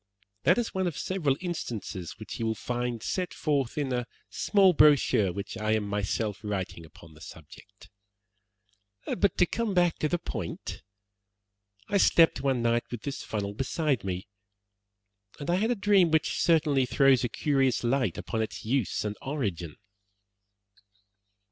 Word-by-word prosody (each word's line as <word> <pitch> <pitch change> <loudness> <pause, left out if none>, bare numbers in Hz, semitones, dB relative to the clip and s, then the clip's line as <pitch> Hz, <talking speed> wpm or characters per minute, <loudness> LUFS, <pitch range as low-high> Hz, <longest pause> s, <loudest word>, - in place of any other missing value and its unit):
That - - +5
is 240 -2 -1
one 190 -1 0
of 165 - -4
several 155 -8 0
instances 115 - -5
which 110 +3 -8
you 115 - -1
will 110 - 0
find 120 0 -3
set 180 -1 -2
forth 140 -5 -1
in 140 -3 -1
a 125 -1 -2 0.2
small 195 -3 +4
brochure 145 - +4
which 100 +5 -6
I 110 0 +1
am 110 -1 +1
myself 105 +1 -2
writing 95 -5 -4
upon 80 +1 -16
the 75 - -17
subject. 90 +6 -13 1.2
But 195 -1 0
to 180 - +5
come 220 +2 -2
back 175 -2 +2
to 155 - +1
the 175 - +1
point, 170 - -6 1.1
I 205 - +1
slept 165 -3 +5
one 130 -3 0
night 120 0 +1
with 120 -3 -7
this 140 - -4
funnel 100 -2 -4
beside 135 +1 -1
me, 95 -1 -4 1.1
and 145 +4 -2
I 175 - +2
had 220 +4 +1
a 245 - +2
dream 200 -4 +4
which 160 -1 +1
certainly 150 -6 +3
throws 135 0 +4
a 125 - 0
curious 135 0 +1
light 120 -6 0
upon 110 - -3
its 110 - -5
use 120 -3 0
and 105 0 -3
origin." 100 - -3
130 Hz, 155 wpm, -28 LUFS, 105-160 Hz, 1.2 s, That